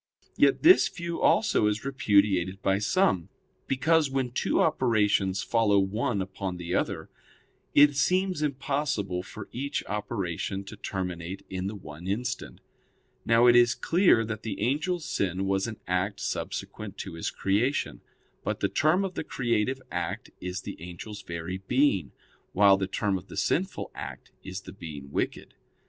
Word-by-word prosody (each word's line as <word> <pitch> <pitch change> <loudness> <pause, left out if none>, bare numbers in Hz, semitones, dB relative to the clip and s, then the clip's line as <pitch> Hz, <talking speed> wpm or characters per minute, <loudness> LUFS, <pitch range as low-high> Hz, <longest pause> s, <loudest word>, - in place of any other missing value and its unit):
Yet - - +3
this 360 +4 +8
view 170 -1 -5
also 205 - +3
is 105 +3 -1
repudiated 100 -8 +2
by 95 0 +2
some, 105 - +2 0.4
because, 150 +3 +3
when 135 -2 -1
two - - 0
operations 105 -5 +2
follow 110 -3 +3
one 100 +2 0
upon 95 -1 -5
the 90 0 -4
other, - - -1 0.6
it 145 0 +7
seems 185 +3 +1
impossible 135 -9 -1
for 100 +3 -9
each 140 +4 -3
operation 100 -2 -3
to 100 +2 -9
terminate 95 -1 -5
in 95 0 -2
the 105 - -4
one 85 -2 -9
instant. 125 +6 -3 0.7
Now 115 +1 +5
it 120 -1 +7
is 120 0 +5
clear 170 - +3
that 110 -1 -5
the 110 -3 -5
angel's 150 - 0
sin 95 0 -1
was 95 +2 +1
an 110 -2 -7
act 90 +3 -1
subsequent 105 -2 -4
to 95 - -6
his 85 - -3
creation. 115 +9 0 0.4
But - - -2
the - - +1
term 175 +6 +2
of 190 - -4
the - - -3
creative 120 -1 0
act - - -3
is 90 +1 -4
the - - -8
angel's 90 +5 -8
very 85 +2 -5
being, 125 0 +1 0.4
while 100 0 +6
the 95 -1 -2
term 95 0 0
of 95 - -17
the - - -10
sinful 185 +3 -1
act - - -8
is 95 0 -6
the - - -11
being 75 -7 -9
wicked. - - -3
105 Hz, 155 wpm, -28 LUFS, 95-135 Hz, 0.7 s, this